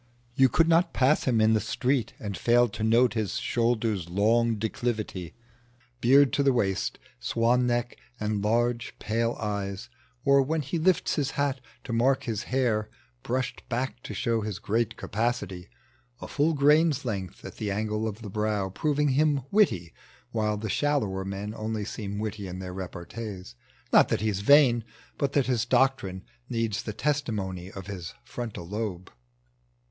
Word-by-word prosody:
You 130 +1 +5
could 165 +7 +3
not 165 +2 +3
pass 135 +3 +3
him 120 -4 +2
in 110 0 +4
the 110 - +3
street 130 0 0
and 100 -2 -5
fail 120 +3 +4
To 105 - -5
note 115 +3 +4
his 110 -4 -1
shoulders' 115 -6 0
long 115 +5 +2
declivily, 110 -5 -3 0.7
Beard 135 +3 +5
to 145 - +2
the 140 -1 +4
waist, 95 - 0 0.2
swan 120 - +2
neck, 120 0 -1 0.2
and 105 -1 -1
lai^e 120 +2 +1
pale 115 +2 -1
eyes; 100 -2 -3 0.4
Or, 140 0 +6
when 155 +3 -1
he 160 +5 -2
lifts 180 +2 +2
his 140 -3 +1
hat, 140 -2 0 0.2
to 120 - -5
mark 130 +4 +2
his 110 -4 -3
hair 120 -5 0 0.3
Brushed 130 - -2
hack 125 0 -2
to 105 - -7
show 115 +3 0
his 105 -3 -4
great 115 +2 -1
capacity 100 -5 -2 0.3
— 120 +1 -38
A - - -7
full 155 +2 +1
grain's 150 0 +4
length 95 -6 -4
at - - -9
the 105 - -3
angle 105 +2 -1
of 110 +1 -6
the 105 - -6
brow 105 -2 -1
Proving 150 +6 +1
him 145 +1 +2
witty, 135 - +2 0.4
while 105 -2 0
the 110 +1 -4
shallower 110 -7 0
men 100 +2 -5
Only 110 0 -3
seeni 100 -2 -5
witty 105 -2 -4
in 90 0 -6
their 90 -1 -6
repartees. 95 +3 -7 0.4
Not - - +7
that 115 - 0
he's 105 -3 0
vain, 125 -1 +6 0.4
but 140 -1 0
that 140 -3 +3
his 120 -3 +1
doctrine 120 -7 +1 0.3
needs 115 -4 -1
The 110 - -5
testimony 105 -9 -2
of 95 -2 -8
his 95 -4 -7
frontal 115 -8 -6
iobe. 100 -3 -4
115 Hz, 165 wpm, -27 LUFS, 100-130 Hz, 0.7 s, Not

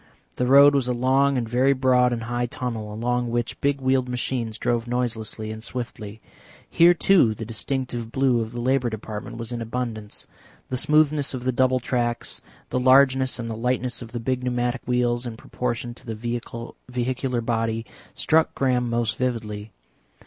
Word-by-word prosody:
The 125 - +1
road 140 +2 +8
was 135 -3 +1
a 125 - +1
long 135 +2 +3
and 120 -2 -1
very 130 +4 +3
broad 125 -1 +3
and 115 -1 -2
high 120 +1 -1
tunnel, 115 -4 -4
along 120 +2 -1
which 120 0 -2
big 140 0 +1
wheeled 130 -1 +1
machines 120 -2 -2
drove 120 0 -1
noiselessly 115 -3 -2
and 110 0 -8
swiftly. 115 -4 -6 0.5
Here, 175 +1 +5
too, 165 - +4
the 110 - -6
distinctive 120 0 -3
blue 130 -2 +2
of 110 0 -4
the 120 0 -5
Labour 130 0 +1
Department 110 -1 -6
was 115 0 -6
in 120 -1 -3
abundance. 115 -2 -5 0.4
The 130 - -1
smoothness 150 0 +2
of 125 - -6
the 130 - +1
double 130 +1 +2
tracks, 120 -1 -2 0.3
the 125 - +1
largeness 130 0 +4
and 120 -2 -5
the 115 - -4
lightness 125 +2 -1
of 115 -1 -9
the 120 - -4
big 125 +2 -2
pneumatic 125 0 -1
wheels 125 0 +1
in 115 -1 -6
proportion 120 0 -4
to - - -16
the 110 - -3 0.7
vehicular 125 0 -1
body, 115 -1 -1 0.3
struck 160 0 +2
Graham 125 -2 +1
most 115 -2 0
vividly. 110 -4 -3
125 Hz, 170 wpm, -24 LUFS, 115-130 Hz, 0.7 s, road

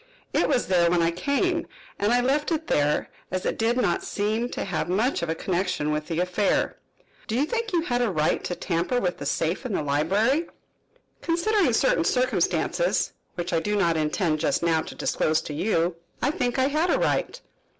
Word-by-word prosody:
"It - - +2
was 245 - +2
there 175 -2 +3
when 170 -1 +2
I 165 - +2
came, 285 - 0 0.3
and 205 +2 +2
I 245 0 +4
left 285 +6 +1
it 320 -1 -1
there, 150 - +1 0.2
as 185 0 -3
it - - 0
did 230 +2 +2
not 380 +9 +1
seem 220 - -1
to - - -4
have 175 -2 -2
much 220 +9 +1
of 170 - -2
a 160 - 0
connection 175 -4 -1
with 150 0 -2
the 165 -1 -2
affair." 180 +3 +1 0.5
"Do 220 - -2
you 270 +4 +2
think 460 +5 -2
you 340 -3 +1
had 245 -6 0
a 240 - +2
right 155 -4 0
to 180 - -2
tamper 180 +9 -1
with 180 -5 -2
the 145 - -4
safe 165 - -1
in 250 -5 -4
the 155 - 0
library?" 200 - +1 0.7
"Considering 345 - +2
certain 165 -6 +3
circumstances, 255 - +1 0.2
which 175 0 -3
I 165 - +3
do 210 +5 -1
not 170 -5 +2
intend 155 +1 0
just 160 - 0
now 165 -2 +2
to - - -9
disclose 155 0 +1
to 150 - -6
you, 170 0 0 0.2
I 280 - +1
think 250 -3 -1
I 260 +1 +3
had 310 +5 +1
a - - +3
right." - - 0
200 Hz, 200 wpm, -25 LUFS, 170-260 Hz, 0.7 s, I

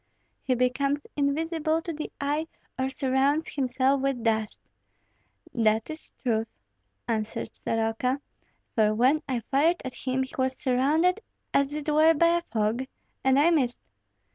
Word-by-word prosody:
He 255 - 0
becomes 275 +4 0
invisible 315 +2 0
to 335 - -4
the 305 0 -6
eye 295 +3 -1 0.3
or 260 0 +1
surrounds 270 +3 +1
himself 265 0 +1
with 270 -3 -1
dust 220 -2 0 0.5
" 100 -2 -29
"That 220 +6 +2
is 315 - -10
truth," 225 -3 +1 0.6
answered 225 0 -3
Soroka; 225 +4 -1 0.5
"for 215 -1 +3
when 260 +7 +3
I 255 -4 -1
fired 300 +9 +2
at 260 - -4
him 260 +1 +1
he 260 - -9
was 260 0 0
surrounded 300 - +2 0.3
as 280 +1 +2
it 300 0 -5
were 310 +2 +5
by 335 +2 +4
a - - -11
fog, 225 -2 -1 0.4
and 265 0 +4
I 310 +4 +5
missed. 255 -7 0
265 Hz, 145 wpm, -27 LUFS, 240-300 Hz, 0.6 s, were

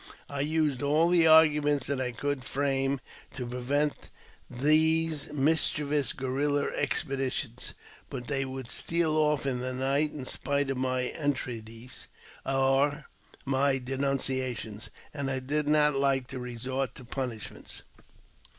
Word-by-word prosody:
I 140 - -3
used 150 -3 +1
all 150 +4 +3
the 170 -2 +6
arguments 150 -3 +5
I 130 -2 -1
could 140 +2 -2
frame 135 0 0 0.3
to 130 -3 -4
prevent 135 +5 -1 0.4
these 155 +2 +2
mischievous 150 -1 +2
guerilla 140 +2 0
ex 145 - 0
peditions, 130 -3 -3 0.4
but 125 -2 -6
they 135 +1 0
would 130 -2 -5
steal 170 -1 +1
off 150 -2 +2
in 130 -2 0
the 130 +1 -3
night 135 +4 +1
in 140 -4 -7
spite 140 +1 -1
of 135 - -2
my 130 -1 0
entreaties 125 -5 -4 0.4
or 135 +2 +2 0.4
my 135 0 +2
denunciations, 130 -4 -2 0.2
and 140 -2 -2
I 135 - 0
did 145 +3 -1
not 150 0 +4
like 135 -1 +2
to 130 - -5
resort 125 +1 -3
to 125 - -10
punishments. 125 -3 -5
135 Hz, 130 wpm, -29 LUFS, 130-145 Hz, 0.4 s, the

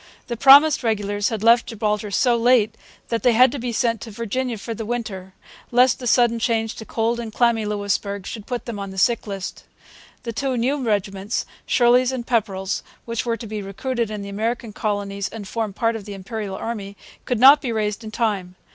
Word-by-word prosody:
The 235 - -4
promised 285 +5 +7
regulars 205 -3 0
had 220 -3 -4
left 235 +1 +5
Gibraltar 210 -2 -2
so 240 +4 +2
late 235 -2 +3 0.4
that 230 -1 -1
they 245 -2 +4
had 250 +2 +6
to 280 - -5
be 245 0 -3
sent 230 0 0
to 230 - -7
Virginia 230 +3 -3
for 230 +3 -5
the 225 - -5
winter, 210 -5 -5 0.3
lest 250 +1 +4
the 250 - -4
sudden 235 -1 +3
change 225 -1 0
to 220 - -8
cold 230 +2 -1
and 230 -2 -5
clammy 230 -1 +2
Louisbourg 200 -1 -2
should 215 -1 -7
put 245 -1 -4
them 230 -4 -5
on 200 0 -5
the 190 - -10
sick 230 +4 +2
list. 195 -3 -6 0.6
The 230 - -4
two 260 +2 -1
new 265 +5 0
regiments, 200 -1 -1 0.2
Shirley's 250 0 +4
and 250 -2 -4
Pepperrell's, 200 -5 -1 0.2
which 230 +1 -3
were 230 -1 0
to 235 - -8
be 215 -1 -5
recruited 230 +4 -3
in 210 -1 -5
the 200 - -7
American 225 +2 -3
colonies 200 -2 -2
and 215 -3 -8
form 220 0 -2
part 230 +3 0
of 215 -3 -7
the 205 -1 -7
Imperial 195 +1 -5
Army, 200 -2 -5 0.3
could 250 - 0
not 275 +4 +8
be 245 - -2
raised 215 0 -2
in 220 - -6
time. 205 -5 -2
225 Hz, 205 wpm, -22 LUFS, 205-240 Hz, 0.6 s, not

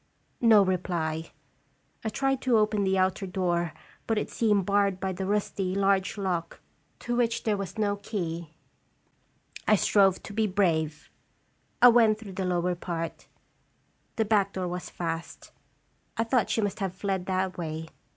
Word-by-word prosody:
No 220 -4 +7
reply. 170 -4 -2 0.7
I 220 - -1
tried 270 +4 0
to 250 -3 +3
open 210 -1 +2
the 190 0 +2
outer 190 +1 +1
door, 175 -3 0 0.4
but 225 - +1
it - - -2
seemed 210 -4 +2
barred 200 -1 +2
by 190 0 -2
the 190 +1 -4
rusty, 195 -2 -1
large 195 0 +1
lock, 175 -4 -2 0.4
to 240 - -2
which 235 -1 +1
there 215 -2 +1
was 195 -1 -5
no 205 -1 +1
key. 170 -6 -5 1.1
I 215 - +6
strove 195 -1 +3
to 205 - -8
be 220 +1 +1
brave. 160 -6 0 0.7
I 245 - +11
went 225 -3 +5
through 215 -3 -10
the 190 0 -2
lower 180 0 +1
part. 170 -1 -5 0.9
The 220 - +1
back 205 -2 +2
door 185 -1 -2
was 180 0 -5
fast. 165 -1 -5 0.7
I 225 - +2
thought 235 +1 +1
she 225 - +1
must 205 -1 -2
have 190 -2 -2
fled 190 -1 -2
that 185 0 -1
way. 160 -1 -4
195 Hz, 160 wpm, -27 LUFS, 180-210 Hz, 1.1 s, I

